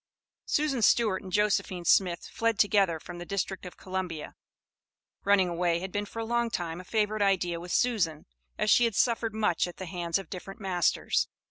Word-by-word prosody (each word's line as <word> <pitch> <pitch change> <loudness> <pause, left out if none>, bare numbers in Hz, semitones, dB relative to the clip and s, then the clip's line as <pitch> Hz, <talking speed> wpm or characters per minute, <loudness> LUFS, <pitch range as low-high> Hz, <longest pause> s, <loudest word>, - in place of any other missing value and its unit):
Susan 290 -5 +1
Stewart 215 -3 +3
and 190 - -9
Josephine 195 -3 +1
Smith 175 -2 +3
fled 230 -1 0
together 195 -5 +3
from 175 +2 -9
the - - -5
District 195 -1 -3
of 180 - -12
Columbia. 185 -4 -5 0.9
Running 200 -2 +4
away 170 -1 +1
had 185 +2 -5
been 205 +1 -2
for 225 - -12
a 225 - -2
long 235 +1 0
time 175 -4 -3
a - - -13
favorite 215 +2 0
idea 180 -4 +1
with 175 +1 -8
Susan, 185 -11 +1 0.3
as 210 - +2
she 240 - +6
had 230 -3 -1
suffered 230 -1 +1
much 210 -6 +1
at 175 - -10
the 190 - -6
hands 170 -1 -1
of 195 - -7
different 195 +3 -8
masters. 185 -4 +1
190 Hz, 190 wpm, -28 LUFS, 175-215 Hz, 0.9 s, she